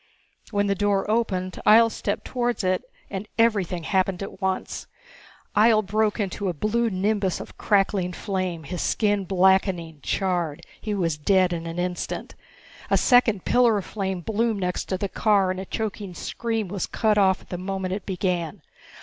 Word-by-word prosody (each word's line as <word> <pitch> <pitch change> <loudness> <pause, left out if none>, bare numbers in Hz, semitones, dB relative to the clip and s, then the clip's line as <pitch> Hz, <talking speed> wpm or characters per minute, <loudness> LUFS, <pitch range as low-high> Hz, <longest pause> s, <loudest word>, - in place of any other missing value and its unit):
When 205 -2 +1
the 200 - +2
door 200 0 +1
opened 185 -5 -1
Ihjel 230 +1 +6
stepped 205 - -3
towards 245 -3 -1
it 185 0 +1 0.3
and 200 +1 -4
everything 200 -7 +2
happened 190 +1 0
at 195 - -9
once. 190 0 -2 0.7
Ihjel 215 0 +5
broke 215 +2 +1
into 200 -1 -2
a 175 - -3
blue 230 +7 +1
nimbus 200 -1 0
of - - -9
crackling 195 -3 +1
flame, 185 -4 -3
his 175 +4 -5
skin 205 -3 +1
blackening, 185 -3 +2
charred. 175 -5 -1 0.2
He 215 -2 -2
was 165 -6 -1
dead 185 +2 +3
in 165 0 -4
an 165 +1 -5
instant. 180 0 -3 0.6
A - - +4
second 240 -6 +4
pillar 240 -3 +4
of 195 - -4
flame 190 -3 -3
bloomed 220 +1 0
next 180 -1 -1
to 185 - -2
the 200 - -2
car, 200 -2 +2
and 185 - -4
a 190 - -5
choking 205 -3 -4
scream 225 0 -3
was 190 +1 -3
cut 215 -2 +2
off 190 -1 +3
at - - -20
the 180 - -4
moment 190 0 -3
it 195 0 -5
began. 180 -2 -2
195 Hz, 170 wpm, -24 LUFS, 185-210 Hz, 0.7 s, Ihjel